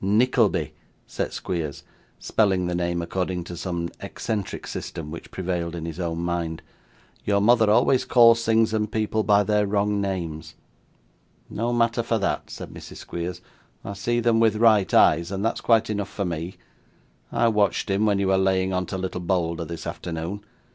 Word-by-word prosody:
'Nickleby,' 110 +2 +2 0.3
said - - -3
Squeers, 80 -5 -4 0.3
spelling 95 -4 +1
the 90 - -2
name 85 0 -1
according 90 +1 -2
to 85 0 -8
some 85 -1 -3
eccentric 105 -4 -4
system 75 -2 -6
which 85 - -8
prevailed 85 -2 -3
in 80 -1 -5
his 85 +1 -6
own 85 -2 -2
mind; 85 -1 -3 0.6
'your 100 -1 +2
mother 110 +1 +4
always 125 +4 +4
calls 115 -1 +5
things 110 0 +3
and 105 -1 -1
people 110 0 0
by 105 -1 +4
their 105 0 +1
wrong 100 0 +1
names.' 85 -5 -4 1.0
'No 115 +3 -1
matter 120 0 +2
for 115 0 0
that,' 100 -2 -2
said - - -8
Mrs. - - -10
Squeers; 85 +1 -5 0.4
'I 100 - -4
see 120 +4 -1
them 115 -1 +2
with 110 -2 +4
right 110 -3 +4
eyes, 85 +4 +4
and 100 +2 -2
that's 115 - -1
quite 115 -1 +3
enough 100 -2 -3
for 100 - -3
me. 85 +1 -4 0.8
I 120 0 +2
watched 105 -5 +1
him 100 +2 +1
when 100 -1 +2
you 100 -1 +1
were 95 0 +3
laying 95 0 +1
on 90 -1 -1
to 95 - -4
little 90 -1 -4
Bolder 85 -2 -1
this 85 0 -7
afternoon. 85 +5 -5
95 Hz, 175 wpm, -24 LUFS, 85-110 Hz, 1.0 s, calls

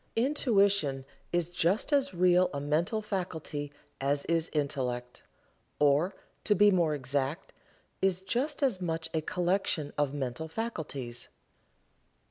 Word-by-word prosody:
Intuition 200 - +2 0.3
is 175 -1 0
just 180 - +1
as 280 -1 +3
real 180 0 +4
a - - -1
mental 160 +9 0
faculty 160 -7 -4 0.3
as 140 +1 0
is 165 0 0
Intellect 125 -4 -2 0.6
or, 150 +6 +3 0.3
to 210 - +3
be 205 +2 +6
more 170 -5 +2
exact, 140 +4 -2 0.5
is 190 -1 +2
just 250 +11 -1
as 235 -9 +1
much 165 -2 -2
a 160 - +1
collection 175 -3 0
of 145 -2 +2
mental 135 +2 -3
faculties. 150 - -5
165 Hz, 120 wpm, -30 LUFS, 145-195 Hz, 0.6 s, be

